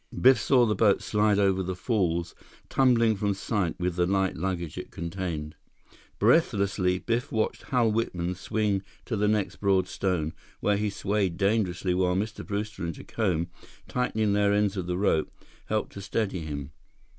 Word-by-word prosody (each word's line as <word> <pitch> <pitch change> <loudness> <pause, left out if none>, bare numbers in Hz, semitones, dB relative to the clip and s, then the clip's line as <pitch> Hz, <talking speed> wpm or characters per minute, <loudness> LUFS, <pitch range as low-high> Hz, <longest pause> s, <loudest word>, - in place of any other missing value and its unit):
Biff 130 +1 +6
saw 125 -3 +4
the 110 - +1
boat 105 -1 +3
slide 105 -1 +2
over 95 -2 +3
the 95 0 -3
falls, 90 -5 0 0.4
tumbling 115 -4 +4
from 100 0 0
sight 100 -3 -2
with 90 0 -1
the 90 0 +2
light 95 -1 +1
luggage 85 -2 -3
it - - -6
contained. 85 -3 -4 0.6
Breathlessly, 100 -2 +2
Biff 120 +7 -2
watched 110 -1 -1
Hal 120 -4 +2
Whitman 90 -6 -1
swing 100 +1 -1 0.2
to 115 - -2
the 105 0 +1
next 105 -2 0
broad 95 -2 +2
stone, 90 -6 -1 0.3
where 105 -1 +2
he 105 0 0
swayed 100 -3 -1
dangerously 100 -3 +1
while 90 0 +2
Mr. 105 +3 -3
Brewster 105 -1 -4
and 85 -1 -3
Jacome, 90 -6 -1 0.4
tightening 110 -4 0
their 100 0 +3
ends 105 -1 +2
of 90 -3 -3
the 90 0 -1
rope, 85 -5 +1 0.4
helped 110 0 -1
to 100 - -7
steady 100 -1 -1
him. 75 -2 -5
100 Hz, 165 wpm, -27 LUFS, 90-105 Hz, 0.6 s, Biff